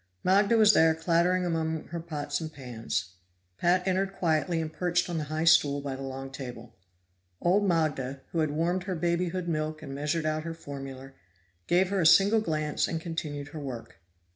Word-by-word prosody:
Magda 200 +4 +4
was 215 -1 +7
there 160 -2 +5
clattering 170 +2 +2
among 160 -2 -1
her 170 - -4
pots 150 -3 -4
and 160 -1 -5
pans; 115 - -5 0.4
Pat 180 +2 +2
entered 190 +1 0
quietly 165 0 +1
and 160 -1 -4
perched 175 0 0
on 165 - -1
the 150 - -3
high 155 +2 -2
stool 145 -4 +5
by 140 -1 -4
the 135 - -8
long 135 0 -6
table. 120 -4 -8 0.6
Old 200 +4 +2
Magda, 145 -6 0
who 165 - -1
had 155 -1 +2
warmed 170 +5 -1
her 190 -2 -2
babyhood 175 +1 -1
milk 155 -1 -2
and 135 -3 -7
measured 150 +3 -1
out 155 0 0
her 165 +1 -6
formula, 135 -3 -8 0.6
gave 180 +1 +3
her 195 -1 0
a 160 - +5
single 200 +6 +6
glance 155 -5 -1
and 165 - -2
continued 150 -4 -5
her 155 - -7
work. 130 -5 -7
160 Hz, 185 wpm, -28 LUFS, 145-175 Hz, 0.6 s, was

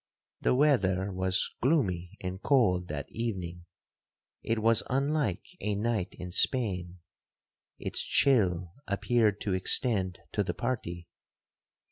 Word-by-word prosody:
'The - - +2
weather 100 -10 +2
was 95 0 0
gloomy 95 - 0
and 95 +1 -5
cold 95 -10 +2
that 70 -2 -5
evening,—it 95 +1 -7
was 115 +1 +4
unlike 135 - 0
a 105 -1 -2
night 105 -2 -2
in 90 0 -8
Spain. 90 -5 +2 0.8
Its - - +2
chill 90 -10 +2
appeared 105 +1 +1
to 100 - -2
extend 95 -1 +2
to 105 - 0
the 90 -2 -4
party. 85 -5 -4
100 Hz, 110 wpm, -29 LUFS, 90-120 Hz, 0.8 s, was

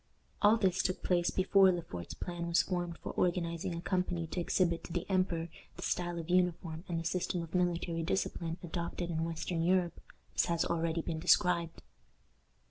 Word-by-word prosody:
All 210 +2 +6
this 190 -4 +2
took 185 - -2
place 175 -1 +2
before 190 0 +5
Le 175 -2 -2
Fort's 90 - -7
plan 175 -1 -4
was 170 +1 +4
formed 175 -2 -3
for - - -3
organizing 170 -1 0
a 170 - -4
company 180 -2 -1
to 165 +3 -4
exhibit 170 -1 +1
to - - -9
the 175 0 -2
emperor 185 -4 +1 0.3
the - - -8
style 175 -1 -1
of 165 -1 -5
uniform 175 -2 +1
and 170 -2 -1
the - - -4
system 180 0 -1
of 165 - -10
military 175 -2 0
discipline 165 -1 -1
adopted 170 +1 -3
in 160 0 -1
western 165 +1 -2
Europe, 175 0 +1 0.3
as - - +2
has 170 -1 +1
already 165 -1 0
been 160 -1 -3
described. 170 0 +2
175 Hz, 180 wpm, -33 LUFS, 165-180 Hz, 0.3 s, All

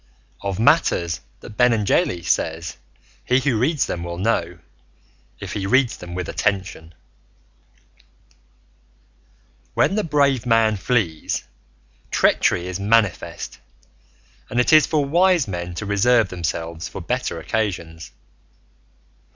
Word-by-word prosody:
OF 100 -2 -3
MATTERS 110 - +2 0.2
THAT 105 - -12
BENENGELI 110 -7 +2
SAYS 80 +1 -1 0.5
HE 125 +1 +2
WHO 130 -5 +1
READS 135 0 +1
THEM 85 - -4
WILL 85 0 -5
KNOW, 90 -4 -1 0.8
IF - - -6
HE 95 -2 -3
READS 130 +2 +2
THEM 90 0 -9
WITH 90 -1 -4
ATTENTION 95 -5 -2 2.8
When - - +3
the 215 +1 0
brave 140 -6 +1
man 115 -2 +3
flees, 95 -7 -1 0.7
treachery 85 - +2
is 95 +1 -4
manifest 105 -2 0 0.9
and 120 - -1
it 125 - +3
is 155 -1 +7
for 150 -3 +1
wise 175 - +3
men 90 -2 -5
to 105 - -5
reserve 105 +2 +3
themselves 85 -1 -4
for - - -8
better 110 0 -3
occasions. 85 - -3
105 Hz, 115 wpm, -21 LUFS, 85-125 Hz, 2.8 s, is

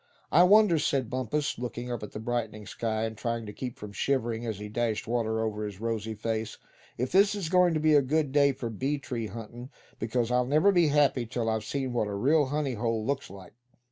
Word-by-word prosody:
"I 170 - +6
wonder," 190 -2 +6
said 135 -5 0
Bumpus, 130 +3 -2
looking 125 0 -5
up 120 - -3
at 105 - -7
the - - -6
brightening 110 -2 -3
sky, 110 +1 -2
and 110 0 -3
trying 115 +1 -3
to 105 - -8
keep 125 +1 -6
from 105 -1 -8
shivering 120 -1 -1
as 110 -3 -3
he 105 +1 -6
dashed 110 0 -1
water 110 -1 0
over 105 -1 -2
his 105 -2 -6
rosy 110 -1 -3
face; 110 0 -3 0.4
"if 125 +2 -2
this 200 +2 +4
is 190 -6 -3
goin' 180 -2 +4
to - - +1
be 155 0 +3
a 145 - +6
good 145 +1 0
day 140 0 +4
for 120 -3 -5
bee 135 +7 -1
tree 120 -5 -4
huntin'; 115 +3 -9 0.3
because 115 +1 -1
I'll 125 0 +2
never 155 +8 +4
be 175 -4 +4
happy 140 -5 +2
till 115 -1 -2
I've 110 -1 0
seen 135 -3 -3
what 115 -3 0
a 100 - -4
real 145 +7 +3
honey 145 -1 -1
hole 115 -1 -1
looks 140 +1 -2
like." 95 -2 -12
120 Hz, 225 wpm, -28 LUFS, 110-140 Hz, 0.4 s, I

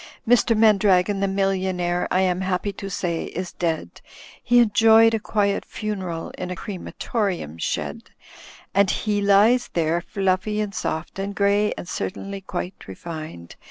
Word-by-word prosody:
"Mr. 235 -1 +4
Mandragon 200 -3 +4
the 195 - +1
Millionaire, 190 -2 0
I 185 - +2
am 185 -1 +1
happy 190 +2 -1
to 195 +1 -7
say, 175 -3 -2
is 180 +1 -6
dead. 165 -2 -3 0.4
He 245 0 +3
enjoyed 225 0 +6
a 225 - +1
quiet 205 -1 0
funeral 190 -6 -5
in 180 - -4
a 180 - -4
crematorium 185 - -4
shed, - - -3 0.6
And 200 0 +4
he 205 0 0
lies 205 +5 +4
there 165 0 +1
fluffy 195 +2 -1
and 210 -2 -2
soft 160 +2 -4
and 200 +1 -4
grey 200 +1 +2
and - - -7
certainly 195 +2 -5
quite 180 0 -6
refined. 155 - -8
195 Hz, 145 wpm, -23 LUFS, 180-210 Hz, 0.6 s, enjoyed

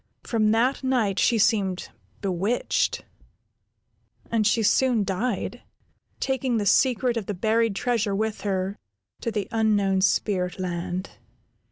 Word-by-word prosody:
From 220 -3 +1
that 240 +5 +1
night 230 -7 +1
she 235 - +3
seemed 200 -4 +1 0.3
bewitched, 195 +4 0 1.3
and 220 -2 +2
she 225 0 +2
soon 245 0 +3
died, 200 +3 -2 0.6
taking 265 -2 0
the 210 - -1
secret 245 +3 +3
of 215 - -4
the 205 - -3
buried 220 +2 +1
treasure 220 -3 0
with 220 +1 -2
her 195 0 -2 0.4
to - - -2
the 210 -3 -2
unknown 205 -4 +2
spirit 185 -2 +1
land. 180 0 -4
215 Hz, 125 wpm, -25 LUFS, 195-230 Hz, 1.3 s, she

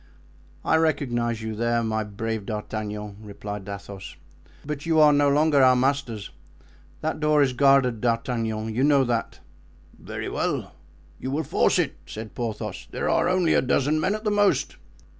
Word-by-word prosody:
"I 160 - +4
recognize 120 -8 0
you 110 0 -3
there, 115 +1 0
my 110 -1 -1
brave 105 0 -4
D'Artagnan," 105 -1 -5
replied 105 -1 -7
Athos; 100 -1 -8 0.5
"but 150 -1 -4
you 160 -1 +3
are 150 -1 +7
no 145 0 +4
longer 145 0 +4
our 130 -1 +6
masters. 125 -5 -1 0.7
That 155 0 -2
door 150 -1 +4
is 130 -2 0
guarded, 135 -4 +3
D'Artagnan; 115 -2 -1
you 125 +4 0
know 140 -2 +5
that." 120 -2 -2 0.6
"Very - - -6
well, - - -2 0.5
you 130 - -4
will 150 +4 -1
force - - +2
it," - - 0
said 110 0 -8
Porthos. 115 -3 -5
"There - - -2
are - - +2
only 180 -3 +2
a - - +4
dozen 140 +4 +1
men 190 +6 +1
at 215 - -7
the 210 - 0
most." 205 -1 +2
125 Hz, 160 wpm, -25 LUFS, 110-145 Hz, 0.7 s, are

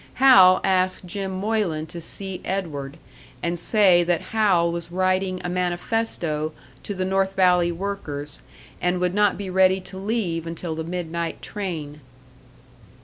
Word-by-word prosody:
Hal 195 -9 +7
asked 185 0 +1
Jim 195 +2 -4
Moylan 190 -5 -1
to 170 +1 -9
see 190 +2 -6
Edward, 155 -7 -4 0.5
and 170 0 -1
say 185 -3 +4
that 170 -1 -1
Hal 185 -6 +3
was 170 0 -5
writing 185 0 0
a - - -2
manifesto 175 -3 -1 0.3
to 200 +9 -5
the 185 0 -1
North 195 0 0
Valley 180 -2 +4
workers, 165 -6 -5 0.4
and 180 0 +1
would 180 0 0
not 205 0 +3
be 200 - -5
ready 190 0 +4
to 190 - -8
leave 190 -6 -2
until 165 0 -4
the 160 0 -4
midnight 170 -1 -4
train. 160 -8 -5
180 Hz, 145 wpm, -23 LUFS, 170-195 Hz, 0.5 s, Hal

